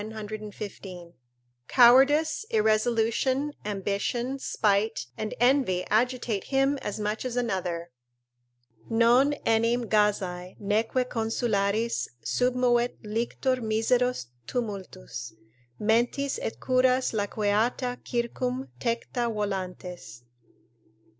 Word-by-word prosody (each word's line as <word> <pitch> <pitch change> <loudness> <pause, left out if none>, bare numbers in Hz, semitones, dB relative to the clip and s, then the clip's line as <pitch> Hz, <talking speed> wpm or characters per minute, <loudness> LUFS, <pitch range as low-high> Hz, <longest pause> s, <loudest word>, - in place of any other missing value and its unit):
] 125 -10 -14
cowardice, 275 - +5
irresolution, 230 +6 +1
ambition, 210 +6 -2
spite, 210 - +1
and 215 +7 -4
envy 245 -8 +3
agitate 235 -2 +1
him 270 +1 +1
as 205 +1 -4
much 210 +1 -2
as 250 -1 -3
another: 180 -7 -2 1.0
"Non 240 +5 +4
enim 230 +2 +2
gazae, 190 -4 0
neque 220 +5 0
consularis 225 -1 0 0.2
Submovet 245 -1 +1
lictor 235 +4 -1
miseros 240 - +1 0.2
tumultus 185 - -5 0.4
Mentis, 240 - +1
et - - -4
curas 255 0 +2
laqueata 220 +4 0
circum 250 +2 -2
Tecta 235 0 -1
volantes." 180 - -5
225 Hz, 80 wpm, -27 LUFS, 200-250 Hz, 1.0 s, cowardice